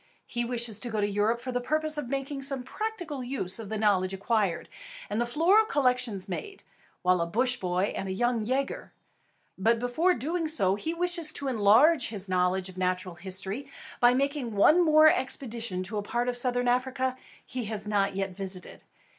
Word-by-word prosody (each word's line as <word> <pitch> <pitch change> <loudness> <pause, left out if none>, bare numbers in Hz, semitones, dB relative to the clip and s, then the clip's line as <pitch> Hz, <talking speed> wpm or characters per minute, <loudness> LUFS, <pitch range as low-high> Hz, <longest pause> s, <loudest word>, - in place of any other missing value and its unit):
He 240 -1 -3
wishes 235 -3 0
to 240 - -3
go 220 -2 -2
to 205 - +1
Europe 210 +3 0
for 255 +1 -4
the 245 0 -1
purpose 310 +4 0
of 295 -5 -4
making 275 +1 -3
some 270 -1 -2
practical 350 - -5
use 245 -7 -1
of 215 -3 -7
the 220 - -2
knowledge 195 -3 +2
acquired, 200 -3 0 0.4
and 220 - 0
the 240 - 0
floral 345 - +4
collections 250 - 0
made, 395 - -6 0.4
while 180 -1 +3
a 170 - 0
Bush 250 +8 +1
Boy 185 +2 -1
and 195 - -4
a - - -2
Young 235 +3 0
Yager. 265 +5 -2 0.7
But 230 +4 +3
before 245 +10 +1
doing 320 +6 -2
so, 195 -12 +2
he 315 +12 -3
wishes 345 -2 -1
to 280 - -4
enlarge 250 +7 +4
his 200 -3 -4
knowledge 185 0 +1
of 185 0 -10
natural 185 0 -1
history 190 +8 -4 0.3
by 245 +1 +5
making 275 -4 -1
one 310 - +5
more 310 -1 +6
expedition 235 -8 0
to 205 +3 -3
a - - -2
part 240 +4 -2
of 250 - 0
Southern 245 0 +1
Africa 255 +1 0 0.3
he 255 -2 -5
has 215 -1 -4
not 200 -2 +1
yet 195 0 -2
visited. 190 -1 -5
240 Hz, 190 wpm, -28 LUFS, 195-275 Hz, 0.7 s, more